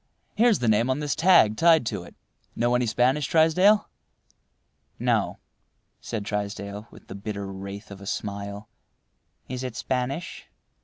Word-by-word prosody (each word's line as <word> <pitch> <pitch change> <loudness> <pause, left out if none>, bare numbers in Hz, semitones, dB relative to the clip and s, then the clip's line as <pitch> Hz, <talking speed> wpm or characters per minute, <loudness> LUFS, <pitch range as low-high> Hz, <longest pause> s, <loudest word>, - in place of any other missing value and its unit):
Here's 230 -2 +4
the 120 - -2
name 110 +3 +3
on 130 - +1
this 145 -2 -1
tag 160 - +5
tied 165 -5 +5
to - - -3
it. - - -13 0.4
Know 120 +1 +1
any 125 -1 +1
Spanish, 130 +5 +2
Trysdale?" 180 +6 +4 1.1
"No," - - 0 0.6
said 105 -3 -5
Trysdale, 100 +1 -4
with - - -16
the - - -8
bitter 100 0 -5
wraith 100 +2 -8
of 100 0 -10
a 100 - -9
smile—"Is 105 +5 -8
it 125 -3 -5
Spanish?" 130 +8 -3
115 Hz, 140 wpm, -25 LUFS, 100-145 Hz, 1.1 s, tag